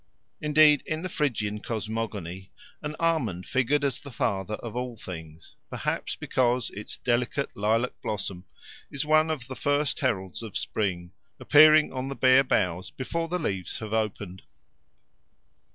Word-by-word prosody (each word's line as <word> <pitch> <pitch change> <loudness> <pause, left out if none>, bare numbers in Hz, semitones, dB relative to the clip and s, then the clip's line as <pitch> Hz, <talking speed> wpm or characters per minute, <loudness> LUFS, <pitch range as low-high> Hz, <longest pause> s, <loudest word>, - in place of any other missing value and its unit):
Indeed 150 -1 +5
in 155 +2 -2
the 185 - -3
Phrygian 110 -10 -1
cosmogony 105 -5 -4 0.3
an 150 0 -4
almond 125 - 0
figured 135 +3 +1
as 135 -4 -1
the 140 - -9
father 105 -5 -1
of 115 +1 -8
all 125 -1 -3
things, 80 -5 -9
perhaps - - -2
because 125 -1 0
its 105 - -7
delicate 125 +3 0
lilac 110 +4 +1
blossom 100 -3 -4 0.4
is 140 +1 -3
one 155 +1 +4
of 150 -6 -3
the 130 - -6
first 145 +1 0
heralds 95 - -1
of 110 -4 -8
the - - -1
spring, 90 -4 -2 0.3
appearing 155 0 +7
on 130 0 -3
the 135 - -4
bare 130 +1 +6
boughs 90 -7 0
before 165 +6 -3
the 180 +2 -1
leaves 95 - -3
have 110 -1 -6
opened. 105 -4 -2
120 Hz, 150 wpm, -27 LUFS, 100-145 Hz, 0.4 s, appearing